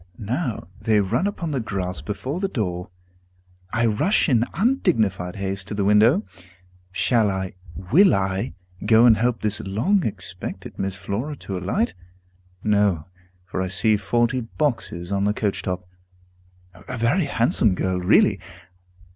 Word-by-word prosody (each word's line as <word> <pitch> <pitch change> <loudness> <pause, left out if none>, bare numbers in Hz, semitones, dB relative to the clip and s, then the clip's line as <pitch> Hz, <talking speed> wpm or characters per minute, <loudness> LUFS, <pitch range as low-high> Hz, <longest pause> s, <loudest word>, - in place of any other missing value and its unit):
Now 115 - -3
they 110 0 +3
run 115 - +1
upon 170 -5 -3
the 135 - 0
grass 90 -7 -3
before 130 - -4
the 195 - 0
door. 90 - -3 0.8
I 120 +1 +1
rush 115 - +2
in 120 -5 +3
undignified 115 - +1
haste 95 -1 -3
to 105 - -4
the 100 -1 0
window. 110 - +4 0.7
Shall 110 +2 +2
I 95 -1 -3 0.4
will 190 - +6
I 95 +4 -1 0.3
go 110 +2 +6
and 115 -2 +7
help 120 +1 0
this 105 -1 +1
long 140 - +1
expected 95 -3 -6
Miss 95 -1 -2
Flora 100 +10 -4
to 95 - -4
alight? 90 -1 -1 0.7
No, 100 -6 +2 0.4
for 95 0 -3
I 95 - -1
see 105 +4 +2
forty 120 +5 +1
boxes 115 - -3
on 100 0 +1
the 105 +1 +1
coach 100 -3 -1
top. 90 -2 -4 1.0
A - - -4
very 120 +10 +2
handsome 115 -6 +2
girl, 95 0 -1
really! 90 - +4
105 Hz, 145 wpm, -23 LUFS, 95-120 Hz, 1.0 s, and